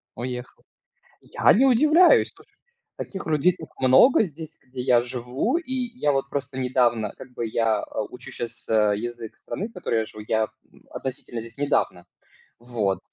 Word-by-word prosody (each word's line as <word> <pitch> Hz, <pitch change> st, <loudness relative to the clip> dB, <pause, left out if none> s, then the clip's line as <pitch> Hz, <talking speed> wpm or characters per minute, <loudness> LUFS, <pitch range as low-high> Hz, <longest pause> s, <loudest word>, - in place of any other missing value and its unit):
Уехал. 125 Hz, 0 st, -6 dB, 0.6 s
Я -, -, +3 dB
не 260 Hz, +6 st, +4 dB
удивляюсь, 305 Hz, +8 st, +5 dB
слушай. -, -, -22 dB, 0.4 s
Таких 190 Hz, -, -6 dB
людей 160 Hz, +3 st, +2 dB
тут 160 Hz, -, -9 dB
много 130 Hz, -, +6 dB
здесь, 160 Hz, -5 st, -7 dB
где 125 Hz, 0 st, -8 dB
я 125 Hz, -1 st, +4 dB
живу, 125 Hz, -, -2 dB
и 335 Hz, -6 st, -5 dB, 0.3 s
я 145 Hz, -, +2 dB
вот 135 Hz, 0 st, -1 dB
просто 140 Hz, -1 st, -4 dB
недавно 120 Hz, -4 st, +1 dB
как 125 Hz, -, -12 dB
бы 120 Hz, -, -4 dB
я, 110 Hz, -1 st, +1 dB
а, -, -, -4 dB
учу -, -, -10 dB
щас, 115 Hz, 0 st, -7 dB
э, 105 Hz, -2 st, +3 dB
язык 120 Hz, 0 st, -6 dB
страны, 205 Hz, -, -5 dB
в -, -, -20 dB
которой 150 Hz, -, -1 dB
я 110 Hz, -, -3 dB
живу. 105 Hz, 0 st, -10 dB
Я, 110 Hz, -1 st, +2 dB, 0.3 s
м, -, -, -21 dB
относительно 130 Hz, -3 st, -6 dB
здесь 115 Hz, 0 st, -11 dB
недавно. 140 Hz, -11 st, 0 dB, 0.5 s
Вот. 115 Hz, -5 st, -1 dB
125 Hz, 170 wpm, -24 LUFS, 115-155 Hz, 0.6 s, много